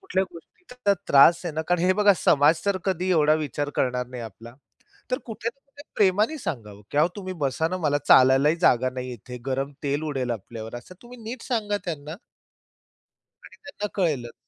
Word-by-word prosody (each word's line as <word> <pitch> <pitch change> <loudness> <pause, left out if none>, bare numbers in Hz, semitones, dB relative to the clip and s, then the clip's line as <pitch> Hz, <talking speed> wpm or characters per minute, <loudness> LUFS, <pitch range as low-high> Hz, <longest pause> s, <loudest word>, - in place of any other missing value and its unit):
कुठल्या 275 - -1
गोष्टीचा 250 - -15
त्याला 200 -1 +4
त्रास 145 +5 +6
आहे 170 - -3
ना 160 - -1
कारण 180 0 +2
हे 185 +1 +4
बघा 205 -1 +6
समाज 150 +1 +3
जर 200 -1 +2
कधी 185 -1 -1
एवढा 155 -3 +4
विचार 145 -1 -3
करणार 125 -1 0
नाही 125 -1 -8
आपला. 115 +1 -11 0.6
तर 255 - 0
कुठे-कुठे 270 +5 -7
प्रेमाने 210 +9 +2
सांगावं, 105 - -6
की 145 - -1
"अहो 155 - +4
तुम्ही 185 -2 -5
बसा 140 +4 0
ना, 185 - -3
मला 145 0 +2
चालायलाही 135 +4 +6
जागा 130 +1 +3
नाही 125 0 -6
आहे 125 - -5
इथे. 125 +2 -10
गरम 135 +1 -2
तेल 145 +1 -1
उडेल 130 -3 -2
आपल्यावर." 115 +1 -6
असं 125 +9 -12
तुम्ही 245 +1 -13
नीट 230 +2 -7
सांगा 215 -5 -1
त्यांना. 155 -2 -5 1.3
आणि - - -15
त्यांना 210 -7 -5
कळेलंच. 145 - -1
155 Hz, 180 wpm, -25 LUFS, 130-200 Hz, 1.3 s, त्रास